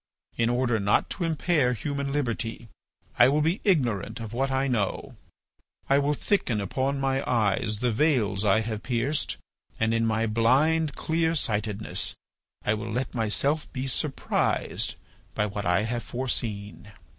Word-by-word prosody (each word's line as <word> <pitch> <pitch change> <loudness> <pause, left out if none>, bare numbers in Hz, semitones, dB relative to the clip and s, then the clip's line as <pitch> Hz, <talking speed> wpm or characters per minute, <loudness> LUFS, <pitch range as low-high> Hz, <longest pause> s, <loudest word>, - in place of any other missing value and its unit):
"In 115 0 +1
order 120 -2 +1
not 100 +1 +2
to 185 - -3
impair 160 -5 +2
human 140 +2 -3
liberty, 120 -4 -2 0.5
I 120 +1 +8
will 150 +2 +2
be 165 +6 +1
ignorant 120 - +1
of 115 -1 -6
what 135 +3 0
I 135 +1 +1
know, 115 -6 -1 0.8
I 140 - +6
will 145 +1 +1
thicken 135 - 0
upon 130 +8 -1
my 135 0 0
eyes 105 -2 +1
the 125 -1 +2
veils 110 -6 +2
I 105 +1 +4
have 110 -1 -4
pierced, 125 +5 -1 0.4
and 110 0 +2
in 115 0 +2
my 110 0 +1
blind 140 +8 +2
clearsightedness 115 -11 -1 0.5
I 105 - +3
will 110 0 -4
let 125 +3 -2
myself 135 +7 0
be 130 0 -3
surprised 135 +2 -1 0.4
by 105 - +1
what 105 -2 -3
I 90 +4 +3
have 120 +2 -2
foreseen." 110 -5 -4
120 Hz, 145 wpm, -27 LUFS, 110-140 Hz, 0.8 s, I